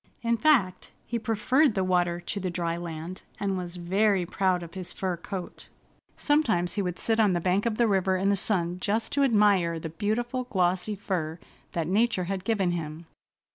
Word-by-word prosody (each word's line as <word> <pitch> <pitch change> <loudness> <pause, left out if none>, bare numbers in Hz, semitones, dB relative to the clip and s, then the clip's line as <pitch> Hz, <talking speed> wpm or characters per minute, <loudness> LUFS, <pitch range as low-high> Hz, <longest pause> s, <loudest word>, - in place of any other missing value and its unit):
In 235 0 +2
fact, 230 -9 +2 0.2
he 235 - -2
preferred 230 +5 +2
the 190 - +1
water 175 -2 +1
to 175 +3 -4
the 185 -1 -2
dry 170 -1 -2
land, 170 +1 -6 0.2
and 195 -1 -1
was 180 -1 -4
very 190 +2 +1
proud 185 0 0
of 170 - -10
his 185 -2 -5
fur 185 -2 -2
coat. 180 +1 -7 0.5
Sometimes 220 - +1
he 205 - -1
would 180 -2 -3
sit 225 0 0
on 210 -4 +4
the 175 - +1
bank 185 +5 +1
of 220 -2 -1
the 235 - +3
river 190 -2 +2
in 195 +2 +1
the 200 - +3
sun 180 -3 0
just 215 +4 -1
to 285 - +1
admire 205 -9 +3
the 160 - -5
beautiful, 240 +9 -2
glossy 185 -1 0
fur 170 -5 -3 0.4
that 165 -2 -1
nature 200 +2 +1
had 190 +1 -3
given 200 -4 +1
him. 165 -1 -5
190 Hz, 190 wpm, -27 LUFS, 175-215 Hz, 0.5 s, on